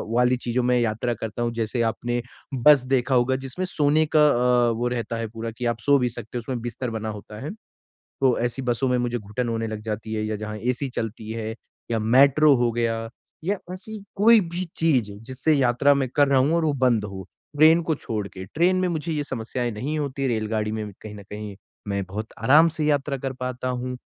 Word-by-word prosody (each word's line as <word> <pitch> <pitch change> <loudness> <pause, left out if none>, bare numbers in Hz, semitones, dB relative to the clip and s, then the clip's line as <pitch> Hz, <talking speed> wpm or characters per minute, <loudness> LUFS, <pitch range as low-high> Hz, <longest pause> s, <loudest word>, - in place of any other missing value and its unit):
वाली 125 +1 +3
चीज़ों 120 +1 -1
में 125 0 +3
यात्रा 115 +1 0
करता 110 0 -5
हूँ 120 - 0
जैसे 115 +1 -1
आपने 120 +2 -2 0.4
बस 150 -4 +8
देखा 130 0 +2
होगा 125 +1 +3
जिसमें 135 +7 -4
सोने 150 0 +2
का 150 -1 +7 0.4
अ, - - +2
वो 120 +2 -1
रहता 115 -1 -3
है 115 0 -3
पूरा 115 +1 -6
कि 120 +2 -6
आप 115 - -16
सो 145 0 +6
भी 125 -1 +1
सकते 120 0 -7
हो - - -1
उसमें 120 +1 -4
बिस्तर 120 +1 -4
बना 110 -1 -3
होता 105 0 -8
है। 155 - -4 0.5
तो 130 -3 0
ऐसी 120 +3 -2
बसों 125 +1 0
में 125 0 +2
मुझे 120 0 -1
घुटन 105 +3 -4
होने 115 -1 -1
लग 110 -1 -5
जाती 110 0 -4
है 110 0 -1
या 110 0 -2
जहाँ 105 0 -5
एसी 125 +4 -1
चलती 110 -1 -4
है 110 -1 -4 0.4
या 115 - +1
मेट्रो 140 +6 +5
हो 120 -1 +2
गया 115 -1 -1 0.4
या 200 +3 0
ऐसी 210 +4 -7 0.2
कोई 225 +3 +7
भी 180 +2 -2
चीज़ 130 -10 +2 0.2
जिससे 130 +4 0
यात्रा 135 +1 +3
मैं 135 -2 0
कर 145 -1 +5
रहा 135 -1 +4
हूँ 140 +5 +2
और 170 - +1
वो 155 - +2
बंद 115 -4 +3
हो 95 -2 -6 0.3
ट्रेन 160 +3 +6
को 160 -1 0
छोड़ 110 -7 -4
के 95 -1 -9
ट्रेन 175 +4 +3
में 185 0 +1
मुझे 165 -1 -2
ये 150 -2 -1
समस्याएँ 120 -1 -3
नहीं 140 +9 -3
होती 140 -2 -2
रेलगाड़ी 110 -2 -1
में 105 -2 -4
कहीं 110 -1 -8
न 100 - -10
कहीं 105 -1 -7 0.3
मैं 100 -1 -1
बहुत 105 +4 -6
आराम 150 +8 +6
से 160 -1 -3
यात्रा 145 -1 +1
कर 135 0 -3
पाता 125 0 -3
हूँ। 125 0 -3
125 Hz, 220 wpm, -24 LUFS, 110-140 Hz, 0.5 s, बस